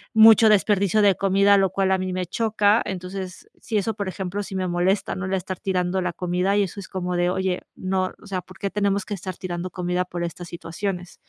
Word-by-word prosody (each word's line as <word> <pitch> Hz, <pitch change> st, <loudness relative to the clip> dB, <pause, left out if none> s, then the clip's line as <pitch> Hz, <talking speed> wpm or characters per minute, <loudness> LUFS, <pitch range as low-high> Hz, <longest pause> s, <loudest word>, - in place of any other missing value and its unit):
mucho 220 Hz, 0 st, +8 dB
desperdicio 205 Hz, 0 st, +3 dB
de 200 Hz, -1 st, +6 dB
comida, 195 Hz, +2 st, +4 dB
lo 195 Hz, -1 st, +3 dB
cual 190 Hz, 0 st, +1 dB
a 190 Hz, -, +4 dB
mí 185 Hz, 0 st, -3 dB
me 185 Hz, 0 st, -2 dB
choca. 215 Hz, +1 st, +2 dB
Entonces, 185 Hz, 0 st, -6 dB
sí, 220 Hz, -1 st, -2 dB
eso, 215 Hz, +2 st, 0 dB
por 200 Hz, -2 st, -3 dB
ejemplo, 190 Hz, +1 st, -4 dB
sí 195 Hz, -, -7 dB
me 185 Hz, -1 st, -1 dB
molesta, 180 Hz, +3 st, +1 dB
¿no?, 185 Hz, -, -4 dB
el 190 Hz, -, -3 dB
estar 185 Hz, -1 st, -4 dB
tirando 185 Hz, -1 st, 0 dB
la 180 Hz, -1 st, -2 dB
comida 180 Hz, +3 st, 0 dB
y 205 Hz, -, +4 dB
eso 195 Hz, +1 st, -5 dB
es 195 Hz, -, -8 dB
como 180 Hz, -1 st, -3 dB
de: 175 Hz, 0 st, +2 dB
"Oye, 190 Hz, -1 st, -1 dB
no, 185 Hz, 0 st, -1 dB
o -, -, -15 dB
sea, 190 Hz, -2 st, -3 dB
¿por 185 Hz, +1 st, -16 dB
qué 200 Hz, -, -2 dB
tenemos 200 Hz, -1 st, 0 dB
que -, -, -5 dB
estar 185 Hz, -1 st, -7 dB
tirando 180 Hz, -1 st, -4 dB
comida 180 Hz, 0 st, -1 dB
por 175 Hz, -1 st, -5 dB
estas 170 Hz, +1 st, -6 dB
situaciones?". 175 Hz, +2 st, -5 dB
190 Hz, 230 wpm, -23 LUFS, 180-200 Hz, -, mucho